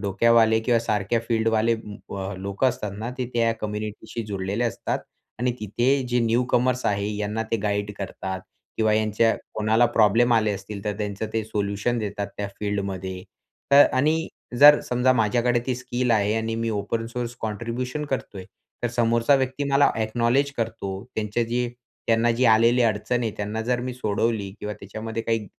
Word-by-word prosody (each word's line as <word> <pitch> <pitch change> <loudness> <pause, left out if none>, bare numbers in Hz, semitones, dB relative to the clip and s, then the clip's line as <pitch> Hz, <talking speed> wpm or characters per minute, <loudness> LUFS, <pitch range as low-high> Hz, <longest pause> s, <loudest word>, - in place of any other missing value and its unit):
डोक्यावाले 110 +2 +4
किंवा 115 +1 +2
सारख्या 105 0 0
फील्डवाले 115 0 +2
अ, 100 -2 -7
लोक 100 +5 -3
असतात 120 -6 0
ना, 115 +3 -4
ते 125 - -1
त्या 115 -1 +3
कम्युनिटीशी 110 +2 -5
जोडलेले 100 +3 -2
असतात. 115 - -2 0.4
आणि 125 +1 +1
तिथे 110 +4 -1 0.2
जे 125 0 +1
न्यूकमर्स 125 +2 +1
आहे 100 0 0
यांना 105 +2 -2
ते 115 - +2
गाईड 105 0 -1
करतात 95 -1 -5 0.4
किंवा 110 -1 +2
ह्यांच्या 110 +1 +2 0.2
कोणाला 110 +3 +3
प्रॉब्लेम 115 +3 +4
आले 110 -2 +3
असतील 100 +1 -7
तर 105 -1 -2
त्यांचं 105 0 -3
ते 110 - 0
सोल्युशन 105 +2 -1
देतात 100 -1 -3
त्या 100 - -2
फील्डमध्ये. 95 -3 -3 0.5
तर 140 +1 +9
आणि 155 +5 +2 0.3
जर 145 0 +10
समजा 125 +1 +3
माझ्याकडे 120 +1 +2
ती 130 - 0
स्किल 125 0 -2
आहे 105 -1 +2
आणि 115 0 -1
मी 115 0 -1
ओपन 110 +2 -2
सोर्स 120 0 -4
कॉन्ट्रिब्युशन 120 +6 -3
करतोय 110 -8 -4 0.4
तर 120 - +1
समोरचा 115 +3 +3
व्यक्ती 130 +2 -1
मला 140 +1 +5
अ‍ॅक्नॉलेज 120 +5 +1
करतो, 110 -4 -4
त्यांचे 110 +2 -1
जे 120 +1 -1 0.4
त्यांना 115 +1 +3
जी 120 +2 +1
आलेली 115 +2 +5
अडचण 115 +2 0
आहे 110 - 0
त्यांना 105 +2 -3
जर 125 -1 +1
मी 125 0 -4
सोडवली 110 -3 -1
किंवा 105 0 -4
त्याच्यामध्ये 110 +3 -5
काही 115 -2 -1
115 Hz, 160 wpm, -24 LUFS, 105-120 Hz, 0.5 s, जर